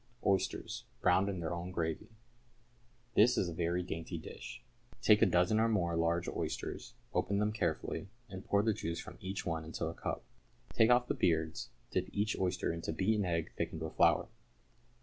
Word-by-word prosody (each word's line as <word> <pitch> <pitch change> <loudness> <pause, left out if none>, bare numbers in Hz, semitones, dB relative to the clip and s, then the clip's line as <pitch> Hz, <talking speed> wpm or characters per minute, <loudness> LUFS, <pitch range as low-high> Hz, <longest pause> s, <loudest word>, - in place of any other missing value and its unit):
=Oysters, 95 -1 0 0.2
Browned 95 +3 +4
in 95 -3 -3
their 85 +1 -2
own 85 +1 -4
gravy.= 80 -3 -2 1.0
This 120 +4 +5
is 90 - +2
a - - -5
very 85 +2 0
dainty 85 0 -4
dish. - - -9 0.4
Take - - +5
a - - +7
dozen 90 +5 +3
or 115 +1 +4
more 85 -6 +1
large 85 +1 +1
oysters, - - -4 0.2
open 95 +2 +1
them 105 +1 +2
carefully, 105 -1 -2 0.2
and 95 -2 -8
pour 100 0 +2
the 110 0 +3
juice 85 -3 -3
from - - -9
each 95 +1 -4
one 80 -2 -1
into 80 0 -4
a 80 - -3
cup. - - -4 0.5
Take 110 - +5
off 125 0 +5
the - - +1
beards, 80 -2 0 0.2
dip - - 0
each 105 +2 0
oyster 90 -2 0
into 85 -1 -3
beaten 100 +5 +1
egg 85 -2 -1
thickened 80 0 -3
with 80 - -4
flour. - - +4
90 Hz, 180 wpm, -34 LUFS, 85-100 Hz, 1.0 s, a